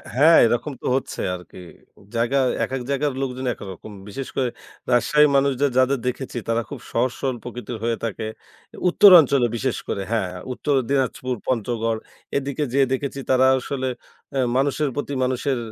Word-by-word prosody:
হ্যাঁ, 155 +5 +7
এরকম 120 +6 0
তো - - -9
হচ্ছে - - -5
আরকি। 90 -1 -12 0.6
জায়গা 120 +4 +1 0.3
এক, - - -2
এক, 130 - -3
জায়গার 140 +1 0
লোকজন 130 -1 -3
একরকম। 95 0 -9 0.2
বিশেষ 135 +6 -5
করে 130 -2 +1 0.4
রাজশাহী 150 +5 +5
মানুষদের 140 0 +2
যাদের 130 +1 +3
দেখেছি 125 0 -3
তারা 115 0 +1
খুব - - -7
সহজ 120 +2 +1
সরল 130 -3 -1
প্রকৃতির 120 -1 -6
হয়ে 115 -1 0
থাকে। 110 0 -4 0.6
উত্তর 200 +3 +7
অঞ্চলে 140 -4 +3
বিশেষ 130 +1 -1
করে 100 - -2
হ্যাঁ, 95 -6 0 0.2
উত্তরে 140 +1 +1
দিনাজপুর, 130 -2 0
পঞ্চগড় 115 -2 -1 0.4
এদিকে 140 +2 -2
যেয়ে 135 -1 +4
দেখেছি 140 +1 -3
তারা 130 0 +4
আসলে 130 0 -3 0.5
আ - - +2 0.2
মানুষের 140 +1 +1
প্রতি 145 0 -3
মানুষের 130 +1 0
130 Hz, 155 wpm, -22 LUFS, 120-140 Hz, 0.6 s, হ্যাঁ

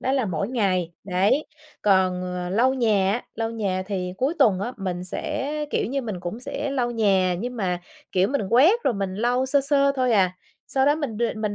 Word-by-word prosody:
đó 260 - 0
là 265 -3 +1
mỗi 190 +2 -2
ngày. 185 -8 0
Đấy, 195 +10 +1 0.4
còn, 185 -2 +3
ờ, 180 -1 -4
lau 245 +7 +3
nhà 210 -6 +2
á, 235 - -2
lau 225 0 -2
nhà 200 -5 -2
thì 185 -3 -3
cuối 275 +6 +1
tuần 210 -10 +4
á, 240 +5 -3
mình 180 -3 -4
sẽ, 290 - -3 0.2
kiểu - - 0
như, 275 +3 -2
mình 210 -7 -5
cũng 180 +6 -5
sẽ 280 +2 -4
lau 250 -3 0
nhà, 195 -6 +2
nhưng 245 +5 -4
mà, 180 -5 -1 0.3
kiểu, 190 +2 +3
mình 280 -4 0
quét 320 - +5
rồi 245 - +2
mình 195 -1 -3
lau 245 +5 +1
sơ 280 +1 +3
sơ 280 0 +2
thôi 255 -2 +2
à. 185 -4 +3 0.3
Sau 265 0 +1
đó 290 - +5
mình 285 -8 -4
đ 235 - -2
mình 215 -1 -2
220 Hz, 220 wpm, -24 LUFS, 185-260 Hz, 0.4 s, quét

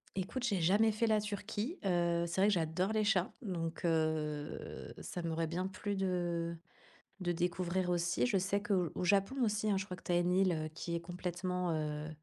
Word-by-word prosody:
Écoute, 195 +7 -3
j'ai 205 -8 +1
jamais 205 +7 +4
fait 220 +2 +1
la 215 -1 +3
Turquie, 210 - -3
heu, 170 -2 +2
c'est 170 +3 0
vrai 200 - +6
que - - +3
j'adore 175 +3 0
les 215 -1 +2
chats, 195 -4 +2
donc 170 -6 -3
heu, 155 -2 -1
ça 175 - -5
m'aurait 165 -1 -1
bien 180 +3 -1
plu 205 +1 -3
de 175 -3 -1 0.6
de 175 -1 0
découvrir 180 +1 0
aussi. 175 0 +1
Je 225 -6 +2
sais 195 +2 0
qu'au 190 -5 +1
au - - -2
Japon 195 +7 +3
aussi, 215 0 +1
hein, 200 - +3
je 190 - -1
crois 185 - -5
que - - -15
tu - - -2
as 175 - +4
une 175 +1 +2
île, 185 -1 +4
heu, 155 -1 -2
qui 170 +2 -4
est - - 0
complètement, 180 0 -2
heu, 150 0 -2
180 Hz, 205 wpm, -34 LUFS, 170-200 Hz, 0.6 s, vrai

